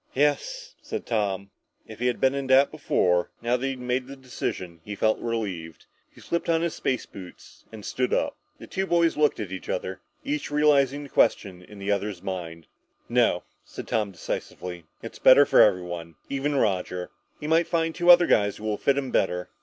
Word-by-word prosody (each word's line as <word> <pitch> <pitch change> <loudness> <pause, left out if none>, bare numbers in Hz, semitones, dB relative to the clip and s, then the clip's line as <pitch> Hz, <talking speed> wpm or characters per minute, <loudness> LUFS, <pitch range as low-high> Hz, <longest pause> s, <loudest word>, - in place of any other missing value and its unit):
"Yes," 475 - 0
said - - -5
Tom. 100 -3 -1 0.3
If - - -11
he 125 - +1
had 125 - 0
been 130 0 +3
in 140 -1 -3
doubt 130 +1 +5
before, 90 - +1
now 120 +1 +1
that 125 - -3
he 135 0 0
had 130 - -10
made 125 +1 -2
the 140 - -8
decision, 95 -10 -5
he 105 +2 -6
felt 110 +2 +1
relieved. 95 -9 -4 0.2
He - - -19
slipped 170 0 -3
on 165 -1 +3
his 170 - -1
space 130 -2 -2
boots 95 -3 -13
and 110 -2 -10
stood 125 -1 -1
up. - - 0 0.2
The - - -11
two 190 0 -3
boys 170 -2 +3
looked 150 -1 +2
at 105 -4 -5
each 95 - -7
other, - - -3 0.2
each 150 0 -3
realizing 145 -1 +3
the 140 - -10
question 95 -7 +1
in 105 +3 -14
the 100 +1 -2
other's 100 -2 -2
mind. 85 -3 -5 0.4
"No!" - - +2 0.2
said - - -9
Tom 110 -2 0
decisively. 90 -1 -6 0.2
"It's - - -8
better 140 +2 +8
for 135 -1 +5
everyone. 85 -4 +1
Even 140 +1 -1
Roger. 90 -6 -1 0.3
He - - -7
might 165 +2 +3
find 165 -1 0
two 175 +2 0
other 175 0 +9
guys 100 -7 +2
that - - -12
will 105 -1 -1
fit 140 0 +1
him 135 -3 -2
better." 90 -1 0
120 Hz, 200 wpm, -26 LUFS, 95-145 Hz, 0.4 s, other